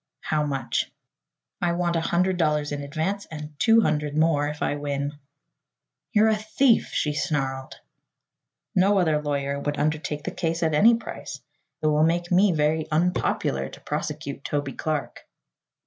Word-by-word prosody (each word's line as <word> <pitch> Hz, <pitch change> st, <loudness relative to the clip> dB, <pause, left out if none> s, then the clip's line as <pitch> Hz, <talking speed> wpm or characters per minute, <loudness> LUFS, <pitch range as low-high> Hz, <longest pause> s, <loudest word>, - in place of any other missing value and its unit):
"How 155 Hz, -1 st, 0 dB
much?" 135 Hz, -4 st, -2 dB, 0.7 s
"I 175 Hz, -1 st, +1 dB
want 175 Hz, 0 st, 0 dB
a 165 Hz, -, +1 dB
hundred 180 Hz, +3 st, +1 dB
dollars 150 Hz, -3 st, +1 dB
in 145 Hz, 0 st, -3 dB
advance 165 Hz, +8 st, -3 dB
and 150 Hz, -1 st, -8 dB
two 225 Hz, 0 st, +5 dB
hundred 150 Hz, -4 st, 0 dB
more 155 Hz, -2 st, +3 dB
if 150 Hz, 0 st, -4 dB
I -, -, 0 dB
win." 145 Hz, 0 st, -2 dB, 1.0 s
"You're 220 Hz, -1 st, +4 dB
a 220 Hz, -, +3 dB
thief!" 220 Hz, +4 st, +2 dB
she 150 Hz, -, -1 dB
snarled. 135 Hz, -3 st, -2 dB, 1.0 s
"No 195 Hz, +2 st, +4 dB
other 160 Hz, -5 st, +2 dB
lawyer 140 Hz, -1 st, -2 dB
would 145 Hz, +1 st, -2 dB
undertake 150 Hz, 0 st, -1 dB
the -, -, -3 dB
case 165 Hz, -1 st, -2 dB
at 160 Hz, -1 st, +1 dB
any 225 Hz, +10 st, +6 dB
price. 230 Hz, -, -7 dB, 0.4 s
It -, -, 0 dB
will 150 Hz, 0 st, +3 dB
make 175 Hz, +2 st, +1 dB
me 190 Hz, +2 st, +5 dB
very 155 Hz, 0 st, +1 dB
unpopular 155 Hz, -, 0 dB
to -, -, -12 dB
prosecute 140 Hz, 0 st, -4 dB
Toby 145 Hz, -2 st, -2 dB
Clark." 155 Hz, -2 st, -4 dB
155 Hz, 155 wpm, -25 LUFS, 145-175 Hz, 1.0 s, any